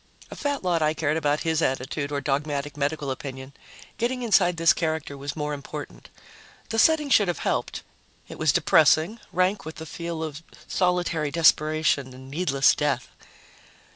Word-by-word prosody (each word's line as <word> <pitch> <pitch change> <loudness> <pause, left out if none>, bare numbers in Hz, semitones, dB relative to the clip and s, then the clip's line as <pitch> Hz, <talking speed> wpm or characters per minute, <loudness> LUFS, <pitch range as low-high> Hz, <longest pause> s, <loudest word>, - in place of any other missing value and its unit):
A - - -7
fat 285 -4 -2
lot 175 -3 +1
I 155 0 +1
cared 155 -1 0
about 150 -2 0
his 160 -1 0
attitude 135 +2 -2
or 140 -1 -2
dogmatic 145 +1 -2
medical 145 -1 -2
opinion. 130 0 -7 0.5
Getting 250 +2 -1
inside 185 -6 +3
this 165 0 +5
character 160 -3 -3
was 140 +1 -6
more 150 -1 -3
important. 135 - -8 0.6
The 225 - -1
setting 300 +1 +3
should 205 -6 +5
have 175 - -1
helped; - - -2 0.4
it - - -10
was 155 -2 +3
depressing, 160 +7 +3
rank 185 +2 +1
with 160 +1 -8
the 160 - -8
feel 170 0 -5
of 155 -1 -6 0.3
solitary 175 -4 0
desperation 155 -4 +2
and 130 +1 -12
needless 140 -4 +3
death. 140 -4 -1
155 Hz, 160 wpm, -25 LUFS, 140-175 Hz, 0.6 s, this